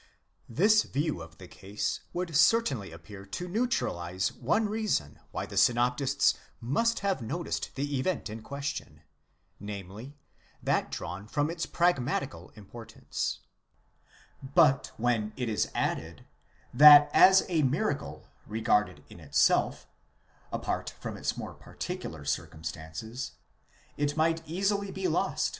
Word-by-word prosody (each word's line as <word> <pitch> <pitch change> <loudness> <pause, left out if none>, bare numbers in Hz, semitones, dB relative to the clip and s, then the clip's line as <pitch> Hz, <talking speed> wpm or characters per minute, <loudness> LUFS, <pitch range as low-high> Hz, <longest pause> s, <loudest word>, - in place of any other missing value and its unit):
*® - - -29 0.5
This 210 - +4
view 145 - -2
of 80 -1 -12
the - - -11
case 100 +2 -4
would 175 -3 -4
certainly 150 - +3
appear 95 +5 -11
to 100 - -6
neutralize 95 - -1
one 220 0 +1
reason 205 - -1
why - - -4
the - - -8
synoptists 125 +4 +3 0.3
must 165 - 0
have 195 -7 0
noticed 155 +10 -4
the 140 0 -2
event 165 -2 -1
in 110 +1 -7
question, 140 - -6 0.6
namely, 105 +7 -8 0.5
that - - +1
drawn 95 +4 -6
from 145 +6 0
its 170 -1 -4
pragmatical 140 -5 0
importance; 110 +2 -5 1.0
but 140 0 +3
when 110 -2 0
it 125 -2 -2
is 110 -2 0
added, 80 0 -2 0.5
that 145 +2 +9
as 190 0 +7
a 170 -4 +1
miracle 135 0 -1 0.2
regarded 105 -1 0
in - - -13
itself, - - +2 0.7
apart - - -3
from - - -5
its - - -3
more - - -6
particular 70 - -7
circumstances, 80 - -5 0.6
it 145 +1 -1
might 165 +1 +2
easily 200 +4 0
be 370 - -2
lost. - - 0
135 Hz, 125 wpm, -29 LUFS, 105-165 Hz, 1.0 s, that